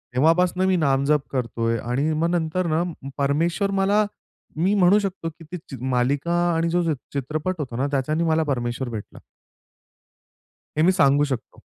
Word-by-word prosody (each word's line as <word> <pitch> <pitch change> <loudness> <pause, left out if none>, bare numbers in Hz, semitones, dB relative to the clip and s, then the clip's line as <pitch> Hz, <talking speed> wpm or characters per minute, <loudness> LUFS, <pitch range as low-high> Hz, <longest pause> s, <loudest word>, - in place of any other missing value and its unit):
तेव्हापासनं 175 +6 +3
मी 190 - +3
नामजप 140 -1 +2
करत 125 -3 -3
आहे 115 0 +1
आणि 145 +5 +1
मग 165 +2 +1
नंतर 170 +1 0
ना, 165 +2 +2 0.3
परमेश्वर 165 +8 +1
मला 205 +2 +3 0.5
मी 185 +5 +2
म्हणू 195 +1 +5
शकतो 190 -4 -3
की 165 +1 -15
ती 180 - -4
चि 135 - -7 0.2
मालिका 140 +7 +1 0.2
आणि 165 +1 +1
जो 175 +1 +1
च - - -4 0.2
चित्रपट 155 +6 -2
होता 130 -5 -4
ना 135 +3 0
त्याच्याने 150 +4 0
मला 160 -1 +2
परमेश्वर 120 -2 -2
भेटला. 110 -3 -8 1.6
हे 155 - +3
मी 185 - +5
सांगू 145 -5 +4
शकतो. 130 -5 -4
155 Hz, 165 wpm, -23 LUFS, 135-175 Hz, 1.6 s, म्हणू